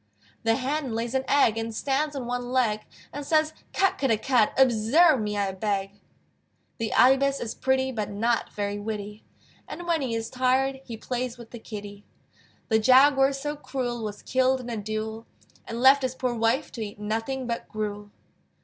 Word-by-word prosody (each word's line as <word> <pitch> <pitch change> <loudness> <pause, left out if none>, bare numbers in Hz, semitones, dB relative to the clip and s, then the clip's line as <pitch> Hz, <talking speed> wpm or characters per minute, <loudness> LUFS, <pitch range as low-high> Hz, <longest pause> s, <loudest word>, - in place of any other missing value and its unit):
The 225 -1 +2
Hen 270 -1 -2
lays 230 +2 -3
an 265 0 0
egg, 230 -6 +3
And 225 0 -4
stands 285 +4 -1
on 265 -3 -4
one 245 0 -3
leg, 220 -5 +1 0.3
And 290 - -5
says, 310 +1 +2 0.2
"Cut 385 -1 +1
ker 270 - +1
dah 225 -3 +2
cut! 235 -1 +2
Observe 260 +4 +5
me, 210 -1 -2
I 200 -1 0
beg!" 195 0 -2 0.9
The 225 -1 -2
Ibis 270 +2 +4
is 230 - -4
pretty, 265 0 0
But 215 -5 -3
not 225 +3 0
very 205 0 -3
witty; 210 0 -6 0.4
And 350 - -7
when 335 -3 +1
he 245 -4 -2
is 225 0 -4
tired 260 +1 +1
He 230 -2 -7
plays 245 +1 -4
with 235 -1 -12
the 235 - -8
kitty. 205 -2 -9 0.7
The 220 -1 +4
Jaguar 270 +3 +5
so 295 +2 -4
cruel 245 -5 -4
Was 210 -1 -6
killed 260 0 +2
in 245 -1 -7
a 230 - -3
duel, 215 +2 -4 0.4
And 230 - -5
left 265 +2 +6
his 260 -1 -2
poor 255 -1 -1
wife 230 +5 0
To 230 - -7
eat 210 -1 -6
nothing 225 +5 -3
but 235 -1 -4
gruel. 210 -1 -4
240 Hz, 185 wpm, -26 LUFS, 215-265 Hz, 0.9 s, left